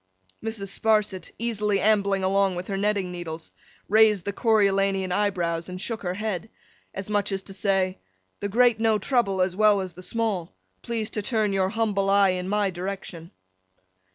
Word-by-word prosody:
Mrs. 220 -3 -4
Sparsit, 210 -5 +1
easily 210 -3 0
ambling 200 -1 +2
along 195 0 +2
with 180 +3 -6
her 195 - -1
netting 200 -2 0
needles, 165 -2 -7 0.4
raised 215 -2 +4
the 200 - -2
Coriolanian 195 -4 +2
eyebrows 175 -4 0
and 180 0 -6
shook 225 +3 -3
her 180 -1 -3
head, 215 -1 -3 0.4
as 195 0 -6
much 205 -1 0
as 195 0 -2
to 195 - -10
say, 190 -2 0 0.4
'The 205 - -3
great 240 +1 +4
know 225 -1 +3
trouble 200 -4 +1
as 185 -1 -2
well 210 0 +4
as 185 -2 -4
the 180 - -11
small. 200 - -2 0.3
Please 225 -2 -3
to 210 - -2
turn 215 -2 0
your 190 -1 +1
humble 205 -2 0
eye 200 0 +5
in 185 0 -2
My 205 -1 +1
direction. 180 -2 -6
200 Hz, 170 wpm, -25 LUFS, 185-215 Hz, 0.4 s, eye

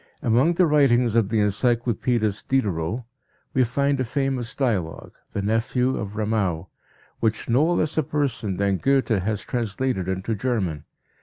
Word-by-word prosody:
Among 130 +8 +3
the 180 - +4
writings 130 -7 +3
of 110 -3 +2
the 110 -1 +2
encyclopedist 115 0 0
Diderot 105 -4 0 0.5
we 130 - +4
find 140 +3 0
a - - +2
famous 130 -1 -2
dialogue, 105 - -2 0.2
The 100 - -2
Nephew 120 +4 +1
of 105 -1 -5
Ramau, 105 -6 -1 0.5
which 110 -1 -1
no 145 +8 +3
less 155 -2 +1
a - - +4
person 135 -10 -2
than 100 -1 +1
Goethe 135 +1 +1
has 105 -1 0
translated 120 -4 -2
into 95 +4 -2
German. 100 - -2
115 Hz, 145 wpm, -24 LUFS, 100-130 Hz, 0.5 s, the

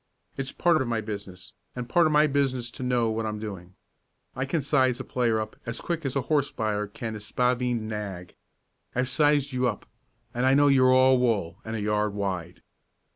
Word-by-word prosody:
It's 135 0 -3
part 170 -4 +2
of 130 - -1
my 115 -1 0
business, 100 -4 -7 0.2
and 125 -1 -5
part 170 +3 +4
of - - 0
my 150 0 +5
business 135 -4 0
to - - -10
know 125 -3 +1
what 110 0 -2
I'm 105 0 -3
doing. 95 -4 -8 0.6
I 130 +1 -1
can 145 +2 -1
size 130 -3 +2
a - - -4
player 120 -4 0
up 110 0 -5
as 115 - -3
quick 165 -4 -3
as 130 - -4
a 140 - +2
horse 145 0 +1
buyer 105 -1 -2
can 110 +2 -6
a - - -6
spavined 125 +1 0
nag. 100 -5 -6 0.6
I've 125 +1 0
sized 145 -2 +2
you 125 0 +1
up, 115 - -3 0.5
and 125 0 -1
I 135 - +5
know 145 0 +5
you're 130 -2 +5
all 130 0 +5
wool 110 -9 0
and 110 0 -5
a 110 - -3
yard 105 0 0
wide." 90 -4 -4
120 Hz, 205 wpm, -26 LUFS, 105-135 Hz, 0.6 s, my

